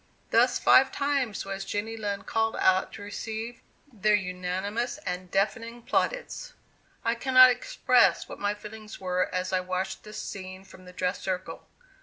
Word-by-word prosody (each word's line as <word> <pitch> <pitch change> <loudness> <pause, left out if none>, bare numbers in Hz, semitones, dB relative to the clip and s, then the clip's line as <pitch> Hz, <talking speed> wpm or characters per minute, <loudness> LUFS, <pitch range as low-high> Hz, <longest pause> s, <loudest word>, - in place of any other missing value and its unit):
Thus - - +4
five 265 0 +6
times 280 -8 -1
was 195 0 -4
Jenny 210 +3 -3
Lind 205 -2 -4
called 225 0 0
out 185 0 +3
to 205 - -8
receive 220 +3 -5 0.3
their 215 0 +3
unanimous 190 +6 -2
and 180 0 -4
deafening 230 +5 -1
plaudits." - - -1 0.5
I 230 - +3
cannot 255 +1 +7
express 250 0 +2
what - - -9
my 205 +1 0
feelings 215 +1 -10
were 185 -1 0
as 185 +1 -2
I 185 - +3
watched 185 +1 -3
this 210 0 -9
scene 185 -1 -7
from 185 -1 -15
the 180 - -11
dress 180 +1 -2
circle. 185 -1 -4
205 Hz, 155 wpm, -28 LUFS, 185-230 Hz, 0.5 s, cannot